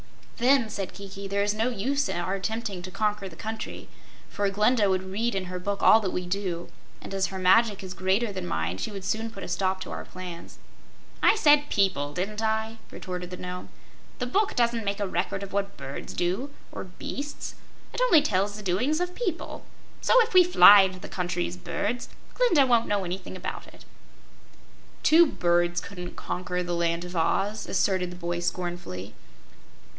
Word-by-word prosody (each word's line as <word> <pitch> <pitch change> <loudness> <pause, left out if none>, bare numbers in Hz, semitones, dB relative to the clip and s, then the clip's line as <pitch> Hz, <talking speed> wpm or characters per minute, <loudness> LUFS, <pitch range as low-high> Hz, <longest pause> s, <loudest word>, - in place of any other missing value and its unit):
"Then," 250 -2 +3
said 195 -3 -4
Kiki, 200 0 -7
"there 200 +1 0
is 205 0 +1
no 225 +3 0
use 270 +6 -1
our 175 +2 -2
attempting 200 0 -3
to 185 - -7
conquer 205 0 -1
the 165 - -13
country, 220 0 -6 0.4
for 205 -1 -1
Glinda 210 +1 +3
would 185 0 +1
read 205 +4 -2
in 190 -1 -1
her 180 0 -5
book 200 +2 -3
all 220 - +8
that 200 -4 -2
we 180 0 -3
do, 180 -2 -3 0.3
and - - -9
as 195 0 +1
her 190 - -6
magic 195 +3 +4
is 185 -1 -6
greater 190 +5 +1
than 185 -2 -5
mine, 80 - -2
she - - -2
would 195 -2 -7
soon 220 +4 -1
put 230 - -9
a - - -5
stop 190 -1 0
to - - -6
our - - -5
plans." 180 -2 -9 0.6
"I - - +6
said 295 -6 +5
'people,' 145 -8 +1
didn't 210 +4 -2
I?" 220 0 -1
retorted 180 -1 -6
the 180 - -7
Nome. 180 0 -6 0.5
"The 250 - -2
book 395 - +1
doesn't 235 -1 +2
make 200 0 -2
a 205 - 0
record 190 +2 -2
of 195 - -8
what 200 0 -2
birds 135 +1 -7
do, 185 +11 -1 0.2
or - - -6
beasts. 280 +10 -6 0.4
It - - -3
only 355 -12 +6
tells 205 -5 0
the 210 - -8
doings 250 - +1
of 360 0 -2
people. 365 -8 -4 0.4
So, - - +5
if 455 - -6
we 365 -1 +9
fly 205 - +9
into 190 -1 0
the - - -9
country 180 -1 -2
as 175 - -6
birds, 230 +6 -3 0.2
Glinda 385 - +4
won't 235 -3 +3
know 205 -1 0
anything 185 +1 -5
about 185 - -6
it." - - -16 1.2
"Two 335 +2 +7
birds 175 -6 +1
couldn't 180 -1 -8
conquer 180 0 -3
the 175 0 -3
Land 170 0 0
of 180 0 -8
Oz," 195 +6 0
asserted 185 -2 +1
the - - -8
boy, 175 -1 -3
scornfully. 175 - -4
195 Hz, 190 wpm, -27 LUFS, 180-225 Hz, 1.2 s, we